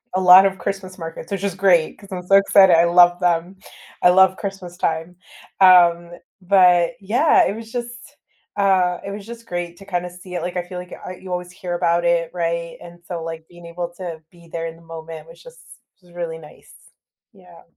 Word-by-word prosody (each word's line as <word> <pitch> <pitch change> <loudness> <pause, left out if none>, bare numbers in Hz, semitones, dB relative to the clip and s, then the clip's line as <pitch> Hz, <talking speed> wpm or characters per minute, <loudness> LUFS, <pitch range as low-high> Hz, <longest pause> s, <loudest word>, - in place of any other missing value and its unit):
a - - +2
lot 185 +1 +8
of 195 -1 0
Christmas 190 -2 -6
markets, 165 0 -9
which 195 -1 -4
is 195 -3 -3
great, 185 -4 +2
'cause 200 - -16
I'm 180 -1 -5
so 195 - +5
excited, 195 -2 +6
I 165 - +4
love 175 +1 +4
them, 175 +1 0 0.5
I - - +6
love 190 +1 +5
Christmas 195 -3 -7
time. 165 0 -3 0.5
Um, 175 -2 +5 0.3
but 180 -2 +4
yeah, 240 +11 +3
it - - -1
was 225 0 -10
just, 240 +3 -8 0.4
uh, 185 -3 +2
it 200 - -5
was 200 0 -8
just 235 0 -10
great 175 -3 -5
to 195 - -14
kinda 180 -2 -3
see 180 +1 -13
it, 175 - -3
like, 180 +2 -5
I 180 - -2
feel 180 0 -8
like 180 0 -10
I 185 - -7
you 185 - -11
always 180 0 -4
hear 180 -1 -6
about 170 0 0
it, 170 -1 +1
right, 170 -1 -3
and 175 0 -13
so, 175 -2 -6
like, 165 0 -8
being 175 -1 -16
able 175 0 -6
to 170 -4 -7
be 170 -1 -19
there 165 0 -4
in 165 0 -7
the - - -20
moment 165 -1 -10
was 250 - -16
just - - -15 0.4
really 170 -2 -7
nice, 150 -2 -17 0.6
yeah. 180 -4 -18
180 Hz, 205 wpm, -20 LUFS, 170-190 Hz, 0.6 s, lot